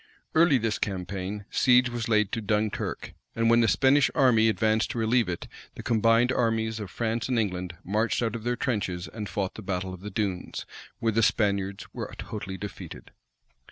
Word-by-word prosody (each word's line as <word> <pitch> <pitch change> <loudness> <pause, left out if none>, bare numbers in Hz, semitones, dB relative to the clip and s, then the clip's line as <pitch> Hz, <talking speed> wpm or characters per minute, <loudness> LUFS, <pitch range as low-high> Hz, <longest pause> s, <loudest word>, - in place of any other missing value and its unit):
Early 160 -3 +5
this 115 -2 -1
campaign, 95 +1 -4
siege 125 0 +4
was 120 -2 -3
laid 105 -2 +3
to 115 - -2
Dunkirk; 105 0 -2 0.2
and 115 0 +3
when 115 - +6
the 115 - +3
Spanish 130 - +4
army 115 -4 +5
advanced 110 +2 +1
to - - -4
relieve 115 -2 +2
it, 85 - -4 0.3
the - - -8
combined 115 +2 +3
armies 115 -2 0
of 105 -3 -6
France 115 +3 -2
and 125 - +1
England 90 -5 -2
marched 110 +5 0
out 115 -1 -1
of 115 - -6
their 120 +1 0
trenches, 95 -9 -2
and 105 -3 -6
fought 95 -2 -2
the - - -9
battle 95 -1 -3
of 90 - -10
the 105 - -6
Dunes, 95 -3 -3 0.3
where 115 - 0
the 115 +2 +2
Spaniards 100 -3 +1
were - - -5
totally 95 -3 -6
defeated. 100 0 -9
110 Hz, 185 wpm, -27 LUFS, 100-115 Hz, 0.3 s, when